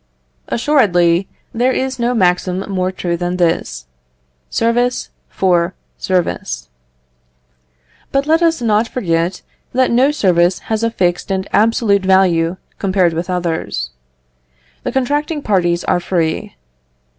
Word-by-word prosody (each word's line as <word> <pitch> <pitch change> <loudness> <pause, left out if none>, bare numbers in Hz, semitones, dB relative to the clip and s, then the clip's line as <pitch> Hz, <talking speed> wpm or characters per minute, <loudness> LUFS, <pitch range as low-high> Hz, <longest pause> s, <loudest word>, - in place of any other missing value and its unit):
Assuredly, 190 - +2 0.3
there 245 +3 +2
is 260 0 -2
no 240 +1 +1
maxim 180 -2 +1
more 185 -1 -1
true 175 -2 -2
than 175 +1 -2
this 115 - -1 0.6
service 240 +2 0 0.2
for 180 -1 +1 0.2
service. 180 - -2 1.4
But 275 0 +1
left 320 +2 +3
us 325 -6 +2
not 220 0 +2
forget 175 -6 -1 0.3
that 255 0 +2
no 255 +4 +4
service 180 - +2 0.2
has 220 - 0
a 230 - +1
fixed 175 -5 -1
and 190 0 -1
absolute 220 -2 +3
value, 185 -2 +3 0.2
compared 185 -3 +2
with 170 +3 -3
others. 165 - -2 0.9
The - - -3
contracting 290 +3 -1
parties 175 -4 +1
are - - +1
free. 175 +3 -2
190 Hz, 120 wpm, -17 LUFS, 175-240 Hz, 1.4 s, no